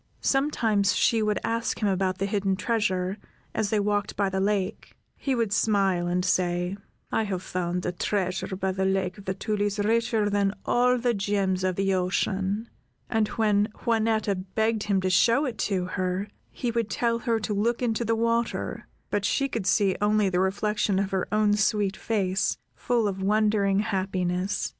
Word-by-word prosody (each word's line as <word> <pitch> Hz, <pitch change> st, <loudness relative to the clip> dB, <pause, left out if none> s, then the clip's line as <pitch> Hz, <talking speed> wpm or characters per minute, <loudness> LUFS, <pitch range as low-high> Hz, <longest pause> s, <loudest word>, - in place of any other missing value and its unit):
Sometimes 225 Hz, -9 st, +1 dB
she 225 Hz, -1 st, +3 dB
would 210 Hz, -1 st, +1 dB
ask 230 Hz, +1 st, -1 dB
him 210 Hz, -, +1 dB
about 190 Hz, -1 st, 0 dB
the 195 Hz, -, -1 dB
hidden 200 Hz, -1 st, 0 dB
treasure, 190 Hz, -2 st, -1 dB, 0.3 s
as 210 Hz, -, 0 dB
they 215 Hz, -, +1 dB
walked 205 Hz, 0 st, 0 dB
by 200 Hz, -1 st, +1 dB
the 190 Hz, 0 st, -2 dB
lake; 195 Hz, 0 st, -2 dB, 0.2 s
he 270 Hz, -2 st, -1 dB
would 230 Hz, -4 st, 0 dB
smile 195 Hz, -5 st, +2 dB
and 180 Hz, +1 st, 0 dB
say, 180 Hz, 0 st, 0 dB, 0.4 s
"I -, -, +2 dB
have 190 Hz, -3 st, -3 dB
found 180 Hz, 0 st, -2 dB
a -, -, 0 dB
treasure 185 Hz, +1 st, -2 dB
by 190 Hz, 0 st, -1 dB
the 190 Hz, 0 st, -2 dB
Lake 190 Hz, 0 st, 0 dB
of 200 Hz, -, -13 dB
the 190 Hz, -, -2 dB
Tulies 205 Hz, 0 st, -1 dB
richer 225 Hz, +1 st, +1 dB
than 200 Hz, -1 st, +1 dB
all 250 Hz, +1 st, +3 dB
the 245 Hz, 0 st, +1 dB
gems 195 Hz, -2 st, 0 dB
of 185 Hz, -1 st, 0 dB
the 195 Hz, 0 st, +1 dB
ocean," 190 Hz, +3 st, -1 dB, 0.4 s
and 220 Hz, -1 st, +2 dB
when 210 Hz, -2 st, +2 dB, 0.2 s
Juanetta 220 Hz, -2 st, +2 dB, 0.2 s
begged 220 Hz, 0 st, +1 dB
him 195 Hz, -2 st, +1 dB
to 185 Hz, -, 0 dB
show 235 Hz, +10 st, +4 dB
it 245 Hz, -5 st, -4 dB
to 185 Hz, -3 st, 0 dB
her, 185 Hz, +2 st, -2 dB, 0.2 s
he 245 Hz, -, -3 dB
would 230 Hz, -2 st, -1 dB
tell, 230 Hz, +3 st, 0 dB
her 230 Hz, -2 st, 0 dB
to 210 Hz, 0 st, -2 dB
look 230 Hz, +5 st, 0 dB
into 235 Hz, -1 st, 0 dB
the 225 Hz, 0 st, +1 dB
water; 230 Hz, +1 st, -1 dB, 0.2 s
but 205 Hz, -, 0 dB
she 275 Hz, +6 st, +1 dB
could 225 Hz, -7 st, -3 dB
see 195 Hz, 0 st, +3 dB
only 210 Hz, -1 st, +3 dB
the 180 Hz, -1 st, 0 dB
reflection 200 Hz, +1 st, 0 dB
of 195 Hz, 0 st, 0 dB
her 190 Hz, -1 st, -1 dB
own 210 Hz, -1 st, +3 dB
sweet 210 Hz, -2 st, +1 dB
face, 195 Hz, -4 st, 0 dB, 0.2 s
full 235 Hz, -3 st, 0 dB
of 195 Hz, -1 st, -3 dB
wondering 205 Hz, -1 st, +2 dB
happiness. 185 Hz, -2 st, -1 dB
205 Hz, 180 wpm, -26 LUFS, 190-220 Hz, 0.4 s, show